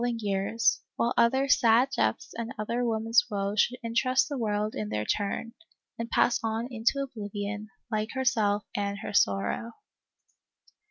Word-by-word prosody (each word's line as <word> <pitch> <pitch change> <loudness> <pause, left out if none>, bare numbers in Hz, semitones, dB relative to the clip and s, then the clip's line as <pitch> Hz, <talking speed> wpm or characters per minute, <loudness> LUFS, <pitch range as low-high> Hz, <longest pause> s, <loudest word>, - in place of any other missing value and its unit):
ing 240 -1 0
years, 200 -1 +1 0.2
while 235 +1 +1
other 265 +4 +3 0.2
$ad 235 +3 +5
deaths 110 0 0
and 230 0 -4
other 235 +3 -1
women's 225 0 +3
woes' 200 0 +1
should 250 - 0
interest 245 +3 +2
the 290 - -4
world 210 -1 -1
in 105 -1 -4
their 105 0 -2
turn, 205 - -2 0.5
and 230 0 -3
pass 240 - +3
on 225 +1 -1
into 250 +4 +1
oblivion, 205 -3 -5 0.2
like 215 0 -1
herself 220 -5 +1
and 200 0 -1
her - - -5
sorrow. 100 - +1
220 Hz, 150 wpm, -28 LUFS, 205-235 Hz, 0.5 s, $ad